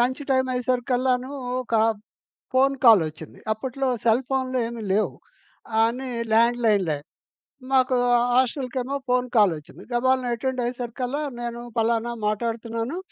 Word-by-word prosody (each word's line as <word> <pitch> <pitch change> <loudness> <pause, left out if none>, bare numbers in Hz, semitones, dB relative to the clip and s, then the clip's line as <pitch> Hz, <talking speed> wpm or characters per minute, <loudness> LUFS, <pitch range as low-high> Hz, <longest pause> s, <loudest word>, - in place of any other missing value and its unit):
Lunch 260 +4 +1
time 260 0 +2
అయ్యేసరికల్లాను, 250 +1 0 0.3
ఒక 235 - -4 0.8
phone 270 +1 +3
కాలొచ్చింది. 160 -8 +4
అప్పట్లో 260 +4 -3 0.2
cell 235 +3 +4
ఫోనులు 260 -1 0
ఏమి 235 -1 -7
లేవు 215 +2 +1 0.7
అని 250 +3 0 0.2
ల్యాండ్‌లైన్‌లే. 220 -9 +3 0.7
మాకు 255 -1 +3 0.4
హాస్టల్‌కేమో 255 +1 0
ఫోన్ 250 0 +1
కాలొచ్చింది. 170 -5 +1
గబాల్న 255 0 +1
అటెండ్ 260 +2 -3
అయ్యేసరికల్లా, 245 +3 -3 0.2
నేను 235 0 -4 0.2
పలానా 230 +1 +1 0.2
మాట్లాడుతున్నాను. 230 - -2
245 Hz, 105 wpm, -24 LUFS, 230-260 Hz, 0.8 s, కాలొచ్చింది